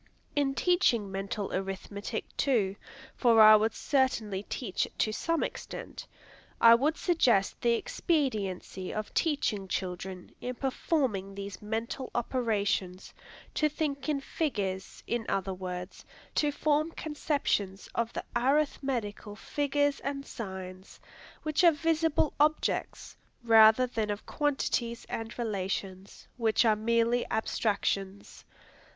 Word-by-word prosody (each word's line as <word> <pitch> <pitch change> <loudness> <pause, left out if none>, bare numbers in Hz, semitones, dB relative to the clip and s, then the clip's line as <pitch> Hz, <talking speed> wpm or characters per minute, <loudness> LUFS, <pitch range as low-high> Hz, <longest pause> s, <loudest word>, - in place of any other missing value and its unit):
In 280 -2 +1
teaching 240 - +2
mental 195 +1 -3
arithmetic, 195 +3 -4
too, 215 -8 +1 0.4
for 235 -3 +4
I 215 0 +10
would 215 +1 +2
certainly 235 -8 0
teach 195 -8 -2
it - - -22
to 215 - +1
some 330 +9 0
extent, - - -6 0.5
I 230 0 +9
would 290 +7 +2
suggest 245 - +2
the 235 -1 +3
expediency 230 - -1
of 215 -1 -5
teaching 245 - 0
children, 180 0 -4
in 250 0 -4
performing 250 - -1
these 200 -1 -7
mental 225 +5 -3
operations, 205 -6 -1 0.4
to 305 - +2
think 285 -2 -3
in 295 -2 +1
figures, 200 - -3
in 235 -1 -1
other 195 -1 -1
words, 180 0 -6 0.3
to 295 -1 +2
form 300 +2 +1
conceptions 280 -11 -1
of 235 0 -1
the - - -4
arithmetical 250 -6 0
figures 285 +4 0
and 275 0 -4
signs, 190 -5 -8 0.4
which 310 +3 +1
are 340 - +8
visible 320 0 +1
objects, 305 +1 0 0.3
rather 225 +1 +7
than 225 -4 -2
of 205 0 -4
quantities 260 -5 -1
and 225 0 -5
relations, 195 -3 -4
which 225 0 +2
are 220 -1 +5
mere 230 +2 +2
abstractions. 200 -3 -2
230 Hz, 120 wpm, -30 LUFS, 195-280 Hz, 0.5 s, I